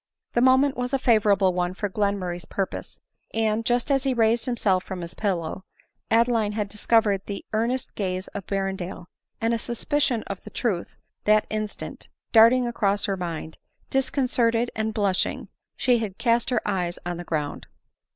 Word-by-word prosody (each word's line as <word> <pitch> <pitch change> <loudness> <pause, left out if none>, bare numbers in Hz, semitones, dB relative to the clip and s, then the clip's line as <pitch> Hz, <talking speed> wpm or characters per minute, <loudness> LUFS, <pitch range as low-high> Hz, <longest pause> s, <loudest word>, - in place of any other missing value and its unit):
The 240 - +2
moment 260 +2 +5
was 250 +2 -3
a - - +4
favorable 210 -6 +3
one 180 0 -1
for 205 - -2
Glenmurray's 190 -4 -2
purpose: 195 +3 -4 0.4
and 220 0 +1
just 245 +3 +1
as 270 -1 +3
he 265 -2 +1
raised 225 0 +2
himself 200 -7 +1
from 185 -2 -6
his 170 0 -5
pillow, 185 -3 -2 0.5
Adeline 225 -2 +3
had 210 -2 -2
discovered 210 -1 +2
the 200 - -5
earnest 235 +4 -1
gaze 185 -2 -3
of 200 - -7
Berrendale; 190 -2 -3 0.3
and 230 +1 +1
a 230 - 0
suspicion 245 0 0
of 195 -1 -7
the - - -9
truth 200 -8 -2 0.3
that 215 0 +4
instant 215 -1 -4 0.2
darting 235 +3 +7
across 205 -4 +1
her 195 - 0
mind, 165 -3 -5 0.3
disconcerted 245 -3 +1
and 220 0 -1
blushing, 200 -3 0 0.3
she 245 -2 +3
had 205 -4 -4
cast 235 0 +2
her 250 - 0
eyes 180 -4 -1
on 175 -1 -3
the 175 - -6
ground. 150 -4 -3
215 Hz, 160 wpm, -25 LUFS, 190-235 Hz, 0.5 s, darting